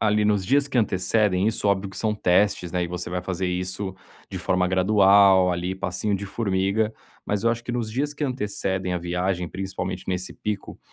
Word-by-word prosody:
ali, 105 -1 +2
nos 105 -2 +2
dias 140 +4 +3
que 135 - 0
antecedem, 100 -1 +2
isso 110 - -2
óbvio 100 0 0
que - - -12
são 110 -1 0
testes, 90 -2 +2
né, 90 -1 0
e - - -2
você 90 0 -5
vai 90 0 -2
fazer 95 0 -2
isso 90 +2 -3 0.4
de - - -4
forma 90 0 +1
gradual 95 0 +5
ali, 90 +2 -2
passinho 95 +2 -2
de 100 +1 -6
formiga, 100 +1 0 0.3
mas 105 -1 -1
eu 115 - +4
acho 115 0 -2
que 120 - -4
nos 120 -3 -2
dias 145 +6 -2
que 150 - -6
antecedem 100 -7 -2
a 90 - 0
viagem, 90 0 -2
principalmente 95 -1 -5
nesse 90 0 -2
pico, 105 -1 -5
95 Hz, 200 wpm, -24 LUFS, 90-105 Hz, 0.4 s, gradual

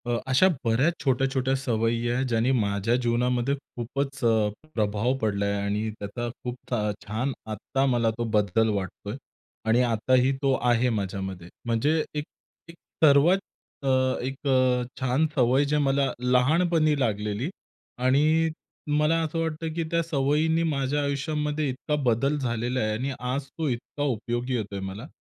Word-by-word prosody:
अ, - - -2 0.2
अशा 135 +9 +6 0.2
बऱ्याच 130 +9 +3
छोट्या-छोट्या 135 0 +1
सवयी 115 -2 0
आहे 125 +2 +1
ज्यांनी 115 +1 +1
माझ्या 100 +2 +1
जीवनामध्ये 125 +2 +1 0.2
खूपच 135 +3 -3
अ, - - +5 0.5
प्रभाव 105 +3 +1
पडला 100 -2 0
आहे 100 0 0
आणि 105 +2 -1
त्याचा 105 +4 -4 0.2
खूप 125 0 -3 0.2
छ - - 0 0.3
छान 115 +6 -2 0.2
आत्ता 135 +6 -1
मला 120 -4 +2
तो 120 - -1
बदल 105 +2 +2
वाटतो 100 +1 -5
आहे. 110 - -4 0.5
आणि 120 +3 +4
आताही 125 +4 +3
तो 135 -1 +3 0.2
आहे 120 +1 +3
माझ्यामध्ये. 95 -4 -3 0.2
म्हणजे 115 +5 +1 0.2
एक, 150 -1 -2 0.5
एक 170 - -11 0.3
सर्वात 155 +5 +6 0.5
अ, - - +2 0.3
एक 135 +3 -5
अ, 130 -2 +3 0.2
छान 130 +4 +2
सवय 130 +1 +3
जे 150 +1 +1
मला 135 0 +2
लहानपणी 155 +5 +3
लागलेली 105 +2 -1 0.5
आणि 150 +6 +3 0.5
मला 150 +2 +3
असं 160 +1 -2
वाटतं, 160 0 -2
की 165 +1 -1
त्या 170 0 +2
सवयींनी 155 +2 +1
माझ्या 140 0 0
आयुष्यामध्ये 150 +1 -1
इतका 130 +3 -2
बदल 130 +5 +2
झालेला 120 -1 -1
आहे 110 -2 0
आणि 130 +6 -2
आज 125 +3 -2
तो 160 -2 -1
इतका 125 +4 -4
उपयोगी 120 -1 -2
येतोय 100 -4 -3
मला. 95 +7 -6
125 Hz, 150 wpm, -26 LUFS, 115-140 Hz, 0.5 s, अशा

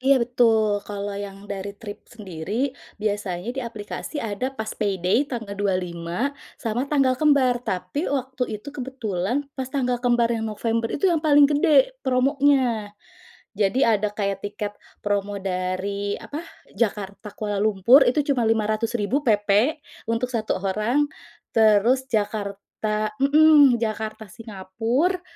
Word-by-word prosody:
Iya, 270 +1 +4
betul, 225 -4 +2
kalau 205 0 -4
yang 200 0 -7
dari 200 0 -5
Trip 205 -3 -8
sendiri, 210 - -4 0.3
biasanya 205 -1 -2
di - - -1
aplikasi 220 +6 -7
ada 205 +5 -2
pas 220 0 -3
payday 195 -1 +1
tanggal 225 -5 -5
25, 180 -2 -2 0.4
sama 230 +2 0
tanggal 270 -3 +3
kembar. 280 -5 +4 0.2
Tapi 190 +10 -3 0.2
waktu 260 0 -3
itu 210 - -11
kebetulan 240 -6 -2 0.2
pas 260 -2 -3
tanggal 250 -3 0
kembar 240 -1 +3
yang 225 0 -3
November 230 +1 -1
itu 285 - -4
yang 325 - +1
paling 290 -1 +7
gede 360 +12 +4
promonya. 255 -5 +2 0.6
Jadi, 205 +5 +2
ada 210 0 0
kayak 200 -1 -1
tiket 205 0 -4 0.3
promo 205 0 -1
dari, 195 +2 -2
apa, 295 +3 -5 0.3
Jakarta, 205 -1 -2
Kuala 205 -2 -2
Lumpur 215 +6 +5
itu 255 - 0
cuma 245 -6 +1
Rp500.000 225 +3 0
PP 215 +4 +2 0.3
untuk 230 +2 0
1 220 -2 -1
orang, 215 +9 +1 0.5
terus 220 +3 +4
Jakarta 210 0 -2
mhm, 290 -2 +6
Jakarta, 220 -1 -3
Singapura 225 - -2
220 Hz, 130 wpm, -23 LUFS, 205-255 Hz, 0.6 s, paling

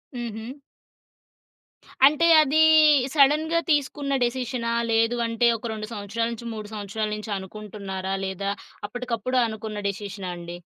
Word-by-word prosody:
హుహు. 230 -1 -5 1.6
అంటే 305 +3 +2
అది, 305 +1 +2 0.6
సడెన్‌గా 305 +4 +4
తీసుకున్న 285 -1 0
డెసిషనా? 245 -1 -2 0.2
లేదు 225 +1 +2
అంటే 230 +1 +2
ఒక 230 +1 -6
2 215 -1 -5
సంవత్సరాల 215 +2 -2
నుంచి 235 0 -7
3 215 -1 -7
సంవత్సరాల 215 +1 -3
నుంచి 210 +1 -7
అనుకుంటున్నారా? 195 -1 -6
లేదా 190 +1 -3 0.4
అప్పటికప్పుడు 245 +1 -3
అనుకున్న 220 -1 -6
డెసిషనాండి? 185 -4 -6
225 Hz, 110 wpm, -24 LUFS, 205-250 Hz, 1.6 s, సడెన్‌గా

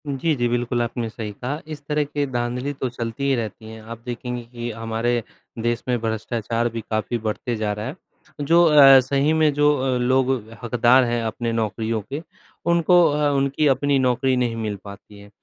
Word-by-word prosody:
जी, 145 +3 0
जी। 120 -2 0
बिल्कुल 120 0 0
आपने 115 -1 -3
सही 110 -1 -6
कहा, 125 +8 -5
इस 155 -2 -7
तरह 150 0 +1
की 145 0 -2
धांधली 125 +2 -2
तो 130 -1 -3
चलती 115 +1 -5
ही 140 -1 +2
रहती 110 -1 -5
हैं। 110 0 -10
आप 115 +1 -9
देखेंगे 125 0 -4
कि 120 0 -7
हमारे 115 +2 -1 0.4
देश 120 0 -1
में 125 -1 +1
भ्रष्टाचार 115 +1 -2
भी 115 0 -5
काफ़ी 110 +2 -1
बढ़ते 115 +2 -3
जा 105 -1 -1
रहा 105 +1 -5
है, 135 +6 -5 0.5
जो 170 +4 +4
अ, 140 -4 +8
सही 140 +4 +1
में 155 -1 +3
जो 145 +1 +4
अ, 130 -1 0
लोग 130 +1 +2 0.3
हकदार 120 +2 +4
हैं 120 -1 -1
अपने 115 +1 -2
नौकरियों 110 0 -1
के 145 +3 -3 0.5
उनको 170 +1 +5
अ, 145 0 +1
उनकी 140 +2 +1
अपनी 140 +1 +2
नौकरी 130 0 +2
नहीं 120 -2 0
मिल 110 -2 -3
पाती 100 0 -12
है। 100 0 -14
120 Hz, 190 wpm, -22 LUFS, 115-140 Hz, 0.5 s, अ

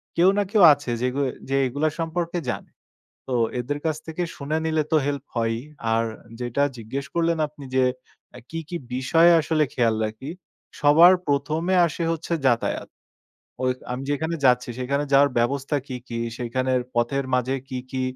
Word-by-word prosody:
কেউ 175 +2 +5
না 205 - +3
কেউ 210 -3 +5
আছে 145 -3 -5
যেগু 125 +2 -1
এ - - -4 0.2
যে 135 - +1
এগুলা 145 +5 0
সম্পর্কে 170 +1 -2
জানে। - - -4 0.6
তো 130 - -3 0.3
এদের 145 +4 -3
কাছ 160 -1 +1
থেকে 160 +2 -3
শুনে 150 +2 -2
নিলে 160 -1 +1
তো - - +4
হেল্প 140 -1 -2
হয়ই। 115 -1 0 0.3
আর 115 0 +2 0.4
যেইটা 125 +3 0
জিজ্ঞেস 120 +5 -5
করলেন 170 0 +2
আপনি 150 -1 -13
যে 130 - +4 0.5
অ্যা 125 - -10
কি, 165 - -4
কি 175 - -4 0.2
বিষয় 150 +7 +4
আসলে 155 0 +1
খেয়াল 115 -3 +2
রাখি? 110 +6 -6 0.5
সবার 160 +5 +7
১ম 145 +2 0
এ - - +4
আসে 170 +1 -4
হচ্ছে 165 +1 -3
যাতায়াত। 120 -2 0 0.8
ওই 130 - +3 0.2
আমি 125 +2 -4
যেখানে 160 +3 -1
যাচ্ছি 125 -1 +4
সেখানে 140 +3 -1
যাওয়ার 140 +1 +6
ব্যবস্থা 135 +4 0
কি, 130 - -5
কি 115 - -4 0.2
সেইখানের 130 +1 0
পথের 120 +4 0
মাঝে 125 +1 +1
কি, 130 -2 -4
কি 130 -1 -2
140 Hz, 170 wpm, -24 LUFS, 125-160 Hz, 0.8 s, সবার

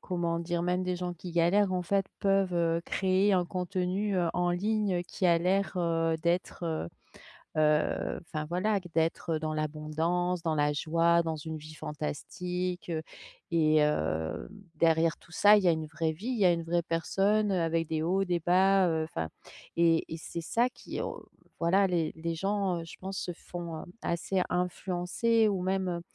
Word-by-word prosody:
comment 170 -2 -1
dire, 170 0 -2
même 180 +1 0
des 180 0 -1
gens 180 0 -4
qui 175 +1 -8
galèrent 185 +4 +3
en 180 - 0
fait 195 +2 +1 0.2
peuvent, 195 -2 +2
heu, 170 0 +1
créer 190 +1 +2
un 180 -2 +3
contenu, 185 +3 -1
heu, 175 -2 +2
en 175 0 +1
ligne 195 0 0
qui 185 - -5
a 170 -1 +5
l'air, 190 +3 +1
heu, 165 -2 +1
d'être, 175 0 -1
heu 160 - -2 0.7
heu, 150 0 +2
enfin 155 -2 -5
voilà, 195 +5 0
q 175 - -12
d'être, 165 0 0
heu, - - -1
dans 155 0 -2
l'abondance, 160 +4 -1
dans 160 -2 0
la 145 0 +2
joie, 170 +3 +3
dans 160 -1 -2
une 155 +1 -6
vie 155 +1 -11
fantastique 175 +4 -4 0.6
et 155 -2 +3
hem, 80 - 0 0.3
derrière 165 0 +3
tout 175 - -21
ça, 210 +1 +7
il 200 - +1
y - - +3
a - - +7
une 160 -1 -2
vraie 160 +1 -2
vie, 200 +10 -8
il 245 -4 -1
y 195 - +4
a 175 - +7
une 170 -1 -2
vraie 170 +1 +1
personne, 195 +6 +1
heu, 180 -3 +1
avec 165 -1 0
des 160 -1 -1
hauts, 190 +4 +2
des 175 -2 0
bas, 185 +2 +4
heu, 160 -1 +1
enfin, 80 - -4 0.5
et 165 -1 +3
et 160 - -3
c'est 170 +1 -6
ça 235 +8 +1
qu'au - - -6 0.3
voilà 190 +4 +3
les 170 -3 0
les 165 +1 -3
gens, 195 -1 0
heu, 165 - -6
je - - -10
pense 190 0 -5
se 175 - -4
font, 170 -2 -7
hem, 175 - -13
assez 180 +2 -1
influencer 180 +5 +1
ou 190 -3 -1
même, 190 0 0
heu, 170 -1 -3
175 Hz, 190 wpm, -30 LUFS, 165-185 Hz, 0.7 s, ça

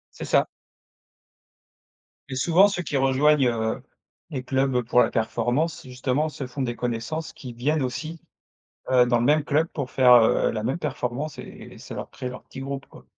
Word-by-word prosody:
C'est - - -6
ça. - - +3 1.8
Et - - -3
souvent 170 +9 +5
ceux 195 -3 -3
qui 150 - -4
rejoignent, 135 +1 +3
heu, 115 +1 -2 0.5
les 135 -6 -4
clubs 130 -1 +1
pour 120 +1 +2
la - - +3
performance, 120 +9 -1
justement 130 +4 -1
se 140 -3 -6
font 125 +3 -6
des 120 -2 -2
connaissances 125 +8 -3
qui 125 -4 -9
viennent 145 +6 0
aussi, 155 +6 -4 0.7
heu, 125 -1 +6
dans 120 -1 +2
le 120 - 0
même 150 +3 +4
club 155 +2 +2
pour 140 -4 -3
faire, 125 -2 +6
heu, 115 -2 +4
la 110 - -3
même 130 +8 -1
performance 140 -1 -3
et - - -11
ça - - -9
leur - - -6
crée 125 - -6
leur 125 - -9
petit - - -10
groupe, 135 0 -5
quoi. - - -16
130 Hz, 180 wpm, -24 LUFS, 125-150 Hz, 1.8 s, heu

